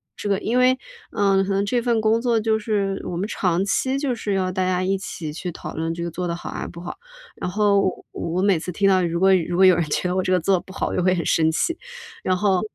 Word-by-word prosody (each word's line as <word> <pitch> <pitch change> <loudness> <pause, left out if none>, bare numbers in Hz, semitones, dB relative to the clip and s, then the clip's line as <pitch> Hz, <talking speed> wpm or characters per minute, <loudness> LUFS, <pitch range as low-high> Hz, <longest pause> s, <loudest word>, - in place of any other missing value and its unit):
这 205 - -4
个 195 - +2
因 240 +3 -1
为， 255 +1 +4 0.3
嗯， 195 -2 +2
可 195 - -3
能 195 +1 +1
这 240 +3 0
份 235 -1 +1
工 220 +1 +2
作 235 -2 +2
就 220 0 +1
是 200 -3 -1
我 175 - -4
们 195 +4 -2
长 180 -4 0
期 260 +6 0
就 275 -3 -1
是 210 -3 -3
要 185 -1 0
大 185 0 -1
家 185 0 0
一 195 +1 +1
起 160 -6 -6
去 175 +2 -5
讨 - - -8
论 165 +1 -2
这 170 0 -5
个 170 - -4
做 180 +2 -3
得 170 - -2
好 - - -7
还 - - -5
是 - - -5
不 170 - -10
好， 175 - -6 0.4
然 - - -4
后 205 +1 +3
我 190 - -2
我 170 +2 -2
每 195 -5 +3
次 180 - -5
听 195 +3 +1
到 185 -1 +4
如 170 0 -1
果 195 +1 +5
如 175 0 -1
果 190 - +6
有 185 -1 +7
人 170 - +1
觉 150 +4 -1
得 180 - -1
我 185 - +2
这 - - -1
个 180 - +3
做 185 +2 +2
不 190 - -14
好 - - -2
就 - - +1
会 185 0 +3
很 170 - -2
生 160 -1 +3
气。 330 - 0 0.5
然 185 -1 +1
后， 190 -2 +2
190 Hz, 305 characters per minute, -22 LUFS, 175-205 Hz, 0.5 s, 有